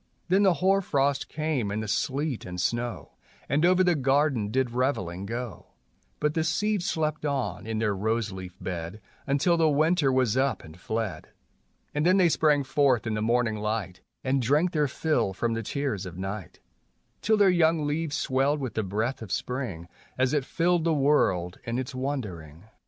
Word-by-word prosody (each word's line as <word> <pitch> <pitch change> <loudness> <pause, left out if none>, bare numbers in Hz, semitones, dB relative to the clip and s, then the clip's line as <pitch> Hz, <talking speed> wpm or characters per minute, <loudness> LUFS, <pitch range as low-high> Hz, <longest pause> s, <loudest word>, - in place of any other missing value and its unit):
Then 190 +2 +4
the 190 -3 +4
hoar 190 +5 +3
frost 140 -5 0
came 150 -8 -1
and 105 +2 -2
the - - -5
sleet 135 +5 -1
and 90 0 -6
snow, 120 +5 -2 0.4
And 145 +3 +1
over 185 +1 +5
the 180 -1 +4
garden 135 -5 +1
did 130 +1 0
reveling 100 -8 -1
go; 120 0 -5 0.5
But 150 0 +1
the 160 - +1
seeds 200 +4 0
slept 155 -2 -1
on 140 -6 -2
in 110 -1 -2
their 105 -2 0
rose 110 +2 -1
leaf 95 -1 -8
bed 85 +2 -5 0.3
Until 145 +5 +2
the 160 -1 +4
winter 155 0 +3
was 130 -4 +2
up 135 +1 +1
and 80 0 -12
fled, 110 +1 -3 0.7
And 150 - 0
then 185 +3 +4
they 180 -3 +5
sprang 150 -2 +3
forth 130 -3 +2
in 110 - -1
the 105 - -1
morning 115 -1 +1
light, 105 -3 -3 0.2
And 135 0 +1
drank 150 +9 +2
their 150 -3 +1
fill 130 -7 0
from 115 +4 -1
the 115 - -2
tears 115 -5 -3
of 90 0 -9
night, 95 -1 -6 0.6
Till 220 0 +3
their 200 -2 +5
young 165 -3 +3
leaves 150 +1 -1
swelled 140 0 +1
with 130 -4 -4
the 110 - 0
breath 110 +7 -2
of 110 -5 -8
spring 125 -11 -3 0.3
As 130 +1 +2
it 145 -3 +1
filled 170 +1 +1
the 165 -1 +2
world 95 -12 +2
in 115 +1 -3
its 130 0 -4
wandering. 100 - -5
130 Hz, 185 wpm, -27 LUFS, 110-150 Hz, 0.7 s, over